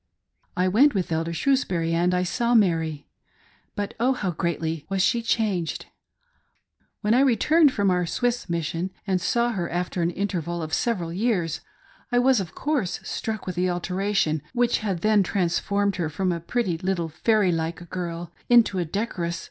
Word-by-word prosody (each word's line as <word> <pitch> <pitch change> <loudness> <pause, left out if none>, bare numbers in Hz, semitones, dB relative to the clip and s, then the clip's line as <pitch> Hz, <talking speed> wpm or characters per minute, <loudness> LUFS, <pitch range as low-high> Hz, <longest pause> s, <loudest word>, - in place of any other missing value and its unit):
" - - -45
I 180 +1 +2
went 250 +9 +4
with 185 -3 -1
Elder 165 +1 -1
Shrewsbury 170 - 0
and 175 +2 +2
I 180 - +1
saw 235 +6 +1
Mary. 165 -8 +2 0.7
But 205 -1 -3
oh, 250 +3 +3
how 200 -7 -2
greatly 165 -2 -2
was 195 -1 +1
she 235 - +2
changed! 205 -8 -1 1.2
When 210 +1 +2
I 250 - +5
returned 280 +4 +4
from 200 -5 +1
our 180 -1 +1
Swiss 245 +2 -1
mission 170 +2 -2 0.2
and 190 -3 0
saw 235 +6 +1
her, 180 -6 -3
after 175 0 -2
an 170 - +2
interval 175 -3 -3
of 155 - -6
several 180 -9 -1
years, 185 -5 0 0.5
I 245 - +2
was, 250 -1 +4
of 180 -5 -6
course, 285 - -1
struck 220 -2 -4
with 185 - -4
the 180 +1 +1
alteration 180 -2 0
which 245 -1 +2
had 195 -6 -2
then 215 -1 +4
transformed 200 +2 0
her 165 -3 -1
from 185 +4 -1
a 170 - -2
pretty 175 -1 -1
little 180 -3 -1
fairy 205 +4 +2
like 165 +1 -3
girl 170 -2 -4 0.2
into 230 -6 +5
a 175 - 0
decor 195 0 -3
ous 170 0 -3
185 Hz, 175 wpm, -25 LUFS, 170-220 Hz, 1.2 s, I